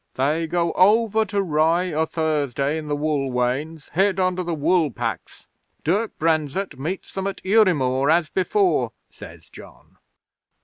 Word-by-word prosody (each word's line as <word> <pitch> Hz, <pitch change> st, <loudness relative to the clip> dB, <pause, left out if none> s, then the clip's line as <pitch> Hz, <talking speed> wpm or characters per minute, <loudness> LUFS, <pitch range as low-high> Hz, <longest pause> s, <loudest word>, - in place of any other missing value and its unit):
'"They 150 Hz, +5 st, 0 dB
go 170 Hz, 0 st, 0 dB
over 220 Hz, +3 st, +3 dB
to 200 Hz, -1 st, -1 dB
Rye 165 Hz, +2 st, +1 dB
o' 160 Hz, +1 st, 0 dB
Thursday 150 Hz, -2 st, -1 dB
in 155 Hz, -, -8 dB
the 145 Hz, -, -1 dB
wool 145 Hz, -2 st, -1 dB
wains, 135 Hz, +6 st, -2 dB
hid 195 Hz, +2 st, +2 dB
under 185 Hz, 0 st, 0 dB
the 175 Hz, -2 st, -3 dB
wool 160 Hz, +1 st, +2 dB
packs. 115 Hz, -7 st, -6 dB, 0.4 s
Dirk 205 Hz, +8 st, -1 dB
Brenzett 155 Hz, 0 st, -1 dB
meets 170 Hz, +7 st, -5 dB
them 195 Hz, 0 st, -3 dB
at 195 Hz, -, -5 dB
Udimore, 150 Hz, -, +3 dB
as 165 Hz, 0 st, +3 dB
before," 365 Hz, -, +1 dB, 0.2 s
says -, -, -13 dB
John. -, -, -16 dB
160 Hz, 145 wpm, -22 LUFS, 145-185 Hz, 0.4 s, over